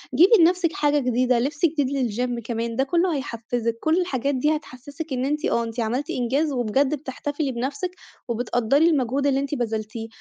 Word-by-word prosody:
جيبي 360 +6 +6
لنفسِك 345 0 +3
حاجة 295 -6 +2
جديدة، 250 -1 +2
لِبس 290 +6 0
جديد 280 -6 0
للGym 245 +2 -2
كمان، 230 0 -3
ده 265 - +2
كُلّه 340 +4 +1
هيحفّزِك، 235 -3 -3
كُلّ 320 +7 +2
الحاجات 280 -5 -1
دي 300 +4 +2
هتحسّسِك 290 +1 -7
إن 255 0 -1
أنتِ 300 +3 -1
آه، 235 - +1
أنتِ 230 +1 -6
عملتِ 240 +5 -1
إنجاز، 270 +5 0
وبجد 265 +3 +1
بِتحتِفلي 285 +1 -4
بنفسِك، 275 +9 -3 0.4
وبتقدّري 245 +6 +2
المجهود 275 -2 +1
اللي 270 -1 +2
أنتِ 280 +1 -2
بذلتيه، 225 -2 -3
270 Hz, 170 wpm, -24 LUFS, 240-295 Hz, 0.4 s, جيبي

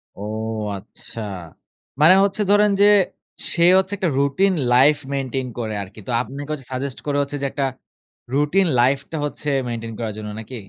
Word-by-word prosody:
ও, 100 - -7 0.5
আচ্ছা। 105 +3 -9 0.8
মানে 160 +4 +8
হচ্ছে 200 +1 0
ধরেন 205 0 +5
যে, 205 - +8 0.7
সে 170 - +2
হচ্ছে 190 +1 +1
একটা 185 -3 0
রুটিন 185 +8 +2 0.2
লাইফ 140 +4 +6 0.2
মেইনটেইন 135 -1 -2
করে 110 -2 -3
আরকি। 100 +3 -13
তো - - -2
আপনাকে 140 +3 -7
হচ্ছে 135 -4 -7
সাজেস্ট 130 0 -3
করে 145 -1 0
হচ্ছে 140 +1 -3
যে, - - -1
একটা 140 - -1 0.7
রুটিন 150 +7 +3
লাইফটা 140 +5 +1
হচ্ছে, 150 0 -4 0.2
মেইনটেইন 115 -1 -5
করার 110 -2 -3
জন্য। 105 -1 -6
নাকি? 110 +4 -8
140 Hz, 165 wpm, -21 LUFS, 120-160 Hz, 0.8 s, মানে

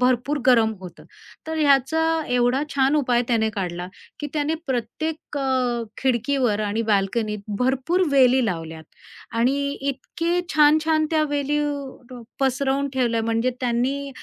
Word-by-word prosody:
भरपूर 255 +3 +1
गरम 225 -3 +5
होतं. 180 -2 -11 0.4
तर 320 0 -3
ह्याचा 285 +2 +3 0.3
एवढा 245 +2 +2
छान 275 +1 +3
उपाय 245 -4 +2
त्याने 220 -2 +1
काढला, 180 -4 -4 0.3
की 295 - -3
त्याने 305 +1 0
प्रत्येक 285 +5 -3
अ, 255 -3 0 0.2
खिडकीवर 250 -3 +1
आणि 210 +2 -1
बाल्कनीत 210 +2 0 0.2
भरपूर 265 +8 +1
वेली 260 -2 +5
लावल्यात 165 -3 -5 0.5
आणि 255 +5 +2 0.2
इतके 330 +5 -2
छान-छान 310 +1 +4
त्या 310 -1 +2
वेली 290 0 0 0.5
ड्रोप 245 -3 -11
पसरवून 270 +1 +1
ठेवल्या, 235 -3 +1
म्हणजे 230 +2 0
त्यांनी 255 +3 -1
255 Hz, 125 wpm, -23 LUFS, 230-285 Hz, 0.5 s, गरम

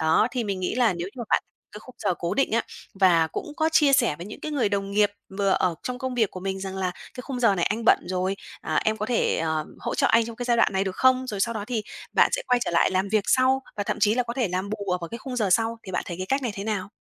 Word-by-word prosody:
Đó, 160 +8 +3
thì 250 -2 -2
mình 195 -3 -3
nghĩ 185 - -1
là 240 -6 +3
nếu 175 +1 -4
như - - -18
mà 235 - -3
bạn - - +3 0.3
cái 210 - -9
khung 255 - -14
giờ 180 - 0
cố 175 +2 -2
định 275 - +1
á, 230 +1 +2 0.4
và 170 -4 +5
cũng - - -4
có 315 0 +2
chia 300 -3 +5
sẻ 275 - +4
với 170 - -8
những 210 - -9
cái 305 - -5
người 250 -8 +1
đồng 200 -1 -2
nghiệp 205 0 +3 0.3
vừa 200 -1 +2
ở 180 -2 +2
trong 250 0 -4
công 260 -1 -3
việc 225 -5 +2
của 185 - -8
mình 190 0 -3
rằng 190 0 -5
là 185 -1 -1 0.2
"Cái 250 - -7
khung 255 -1 -5
giờ 230 -5 +4
này 175 -3 +1
anh 225 +2 -1
bận - - +6
rồi, 185 +1 -1 0.2
à, - - -2
em 220 0 +1
có 215 0 -3
thể, 245 - +1
ờm, 160 -1 -1
hỗ - - -3
trợ - - +2
anh 230 0 +4
trong 230 -1 -8
cái 245 - -4
giai 240 -1 +2
đoạn 230 - +3
này, 190 0 +1
được 190 -1 -4
không?" 260 0 +3
Rồi 205 -5 -4
sau 230 +3 +1
đó 210 -2 -3
thì 230 -3 -2 0.3
bạn - - +5
sẽ - - 0
quay 250 - +3
trở - - -2
lại 170 - +3
làm 190 +1 0
việc 210 0 +1
sau, 260 +1 +3
và 205 - -1
thậm - - -2
chí 210 +1 +4
là 250 - +2
có 235 - -5
thể 245 -5 0
làm 185 +3 -3
bù 205 -2 -4
ở 180 - +1
vào 170 - -5
cái 235 - -6
khung 250 +2 -6
giờ 210 -5 +1
sau, 225 +4 +2
thì 190 - -7
bạn - - 0
thấy 175 - -5
cái 185 - -4
cách 270 +6 0
này 240 -4 -2
thế 200 - -5
nào? 210 -3 -2
210 Hz, 320 wpm, -25 LUFS, 190-245 Hz, 0.4 s, bận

